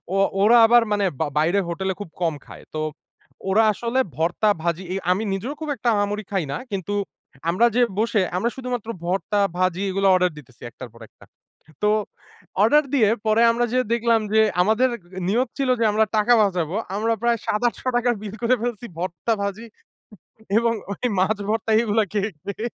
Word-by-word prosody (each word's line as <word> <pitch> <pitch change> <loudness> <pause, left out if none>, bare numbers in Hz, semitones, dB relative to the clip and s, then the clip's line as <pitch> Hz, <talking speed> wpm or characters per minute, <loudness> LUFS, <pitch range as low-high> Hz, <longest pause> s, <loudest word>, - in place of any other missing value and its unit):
ও - - +2 0.3
ওরা 235 +3 +6
আবার 240 0 +6
মানে 205 -1 +1
বা 160 - 0
বাইরে 175 +6 +2
হোটেলে 190 +3 -2
খুব 190 - -7
কম 165 -3 +1
খায়। - - -12
তো 155 - -1 0.7
ওরা 220 +4 +4
আসলে 235 +5 -2 0.2
ভর্তা 175 +6 +1
ভাজি, 170 +2 -1 0.3
আমি 195 +4 +1
নিজেও 230 +9 -3
খুব 310 - -4
একটা 240 -1 -1
আহামরি 205 +1 -1
খাই 190 -6 0
না। - - -3
কিন্তু 195 +2 -3 0.6
আমরা 210 +7 +3
যে 245 - +4 0.2
বসে 225 -2 +2 0.2
আমরা 235 +6 +1
শুধুমাত্র 250 -4 -4 0.2
ভর্তা 195 +3 0 0.2
ভাজি 185 0 0
এগুলো 195 +1 +1
অর্ডার 180 -1 +2
দিতেছি 125 -4 -19
একটার 125 +1 -10
পর 115 - -17
একটা। - - -21 0.6
তো 210 - +3 0.7
অর্ডার 295 +7 +5
দিয়ে 220 -6 +4 0.2
পরে 220 +2 +4
আমরা 240 +1 0
যেয়ে 255 -3 0
দেখলাম 230 -1 +2
যে 220 - +6 0.2
আমাদের 220 +6 +3 0.4
নিয়ত 240 +5 +1
ছিল 270 - 0
যে - - +3
আমরা 220 +1 +3
টাকা 215 +3 +4
বাঁচাবো। 180 -3 -1 0.2
আমরা 225 +2 +1
প্রায় 235 -1 +2
৭ 210 - 0
৳৮০০ 245 0 -1
র - - -9
বিল 210 -1 -6
করে 250 +2 +3
ফেলছি 240 -1 -3
ভর্তা 175 +4 -2
ভাজি 200 +3 -4 0.9
এবং 230 0 +2 0.2
ওই 225 - -6
মাছ 205 +3 +2
ভর্তা 220 0 -1
এগুলা 220 -1 +1
খেয়ে, 205 0 -1
খেয়ে। 200 +3 -4
215 Hz, 180 wpm, -22 LUFS, 190-235 Hz, 0.9 s, ওরা